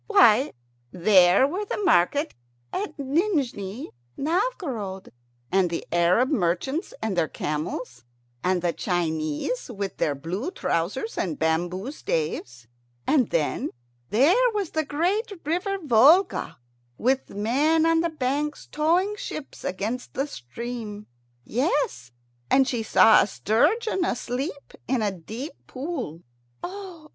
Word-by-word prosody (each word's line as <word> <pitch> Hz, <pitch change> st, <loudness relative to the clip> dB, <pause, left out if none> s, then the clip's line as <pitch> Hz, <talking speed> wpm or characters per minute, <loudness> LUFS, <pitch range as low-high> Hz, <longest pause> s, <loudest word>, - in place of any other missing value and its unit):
Why, 275 Hz, -, +5 dB, 0.4 s
there 185 Hz, +3 st, +5 dB
were 365 Hz, +8 st, -3 dB
the 415 Hz, -, -3 dB
market 290 Hz, -, +2 dB, 0.4 s
at 410 Hz, -, -3 dB
Nijni 275 Hz, -, -1 dB, 0.3 s
Novgorod, 280 Hz, -, -2 dB, 0.4 s
and 190 Hz, -2 st, +3 dB
the 165 Hz, -, -4 dB
Arab 175 Hz, +9 st, +3 dB
merchants 245 Hz, -, 0 dB
with 220 Hz, -2 st, 0 dB
their 170 Hz, -3 st, +1 dB
camels, 150 Hz, -5 st, -4 dB, 0.4 s
and 180 Hz, -1 st, +1 dB
the 175 Hz, -1 st, +1 dB
Chinese 165 Hz, -, -2 dB
with 200 Hz, -4 st, -4 dB
their 145 Hz, -, +1 dB
blue 180 Hz, -, -4 dB
trousers 235 Hz, -, -2 dB
and 165 Hz, -6 st, -1 dB
bamboo 175 Hz, -, -1 dB
staves. 150 Hz, -, -3 dB, 0.4 s
And 260 Hz, -7 st, +3 dB
then 155 Hz, -3 st, 0 dB, 0.4 s
there 310 Hz, -, +4 dB
was 400 Hz, -5 st, -1 dB
the 315 Hz, -, 0 dB
great 370 Hz, -, 0 dB
river 360 Hz, +6 st, 0 dB
Volga, 305 Hz, -, +4 dB, 0.4 s
with 265 Hz, +3 st, +1 dB
men 285 Hz, +11 st, +2 dB
on 330 Hz, 0 st, +4 dB
the 340 Hz, -, 0 dB
banks 295 Hz, 0 st, -2 dB
towing 350 Hz, +7 st, +2 dB
ships 305 Hz, -7 st, -7 dB
against 215 Hz, +7 st, -3 dB
the 270 Hz, -, 0 dB
stream. 215 Hz, -, -7 dB, 0.4 s
Yes, 235 Hz, -, -1 dB, 0.4 s
and 265 Hz, -1 st, +4 dB
she 245 Hz, -4 st, -1 dB
saw 220 Hz, 0 st, +6 dB
a -, -, +1 dB
sturgeon 350 Hz, -, +1 dB
asleep 275 Hz, 0 st, -3 dB
in 245 Hz, -3 st, +1 dB
a 205 Hz, -, +1 dB
deep 220 Hz, -, -7 dB
pool. 255 Hz, -, -5 dB, 0.4 s
"Oh! -, -, -2 dB
oh! 370 Hz, -6 st, -9 dB
250 Hz, 125 wpm, -25 LUFS, -, 0.4 s, saw